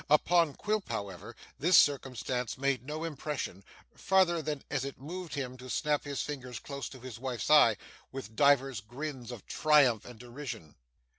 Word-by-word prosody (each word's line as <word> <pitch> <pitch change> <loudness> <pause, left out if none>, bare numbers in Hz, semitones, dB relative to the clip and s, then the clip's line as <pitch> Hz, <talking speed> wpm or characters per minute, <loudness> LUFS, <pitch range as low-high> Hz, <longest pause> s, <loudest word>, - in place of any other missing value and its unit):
Upon 160 0 +4
Quilp, 215 -1 -2
however, 95 -3 -5 0.2
this 170 +6 +5
circumstance 130 -3 +1
made 135 -1 0
no 150 +4 -5
impression, 150 - -4 0.3
farther 180 -3 +3
than 150 -2 -4
as 135 -3 0
it 140 0 -6
moved 170 +3 -6
him 130 -2 -4
to 130 0 -10
snap 150 +2 0
his 140 -5 -2
fingers 130 -5 -6
close 140 +4 -6
to 130 - -11
his 125 -2 -8
wife's 130 +1 -3
eyes, 115 -8 +7 0.3
with 110 -5 -7
divers 135 -5 +4
grins 125 +2 -6
of 120 -5 -9
triumph 140 -8 +4
and 125 -2 -11
derision. 120 - -7
135 Hz, 160 wpm, -31 LUFS, 125-150 Hz, 0.3 s, eyes